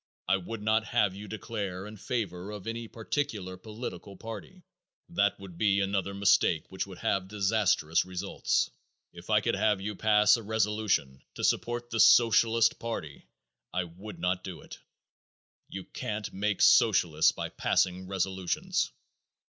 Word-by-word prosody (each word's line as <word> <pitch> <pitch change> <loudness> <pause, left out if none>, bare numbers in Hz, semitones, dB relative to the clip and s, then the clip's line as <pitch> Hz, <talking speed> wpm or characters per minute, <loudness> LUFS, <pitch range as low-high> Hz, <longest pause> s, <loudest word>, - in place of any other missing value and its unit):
I 95 - +3
would 105 +4 -7
not 110 +1 +2
have 100 -3 +1
you 100 +2 -9
declare 100 -3 -5
in 105 +1 -9
favor 100 -4 -3
of 105 -2 -7
any 115 0 -4
particular 110 -5 -3
political 105 0 -8
party. 115 - -9 0.5
That 105 - +1
would 95 -3 -11
be 100 -2 +3
another 100 0 -1
mistake 100 -5 +2
which 95 +1 -3
would 95 -2 -10
have 95 -1 -1
disastrous 95 -5 +2
results. 95 +1 -1 0.4
If - - -12
I - - +4
could - - 0
have 105 -2 +2
you 105 +2 -4
pass 105 +1 +5
a - - -6
resolution 105 -10 0
to - - -6
support 120 0 0
the 115 - -1
Socialist 115 0 +5
party 80 -11 -6 0.4
I 90 - 0
would 95 +5 -10
not 90 0 -1
do 90 -6 -7
it. - - -11 0.9
You 95 0 -6
can't 105 +2 -5
make 100 0 0
Socialists 85 -8 +5
by - - -4
passing 90 0 0
resolutions. 95 -1 -1
100 Hz, 150 wpm, -29 LUFS, 95-110 Hz, 0.9 s, pass